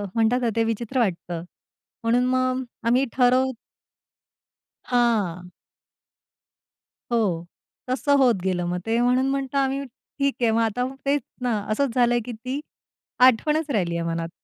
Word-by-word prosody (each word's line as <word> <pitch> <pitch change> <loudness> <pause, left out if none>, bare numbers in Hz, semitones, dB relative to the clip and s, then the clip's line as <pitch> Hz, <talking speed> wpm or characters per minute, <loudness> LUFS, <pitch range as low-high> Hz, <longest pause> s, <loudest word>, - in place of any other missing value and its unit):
म्हणतात 230 +2 +2
ना, 240 - +1
ते 230 - +3
विचित्र 225 +3 -2
वाटतं. 175 -6 -1 0.6
म्हणून 240 +2 +2
मग 255 0 +1 0.2
आम्ही 250 +3 +3
ठरव 255 +1 +3 1.3
हां. 210 -8 0 1.6
हो, 195 -8 +1 0.4
तसं 285 +2 +2
होत 255 -4 +4
गेलं 180 -2 0
मग 180 - -1
ते 225 +1 +1
म्हणून 250 +2 +3
म्हणतो 275 0 -2
आम्ही 275 0 0
ठीक 275 +2 -4
आहे 230 -2 +3
मग 225 +1 +2
आता 230 +2 0 0.2
तेच 280 +1 +2 0.2
ना, 240 -4 0
असंच 250 +3 0
झालंय, 240 -1 +3
की 245 - -5
ती 255 +5 -5 0.6
आठवणच 295 +5 +4
राहिली 180 -8 0
आहे 170 - -2
मनात. 165 0 -2
245 Hz, 135 wpm, -24 LUFS, 220-260 Hz, 1.6 s, होत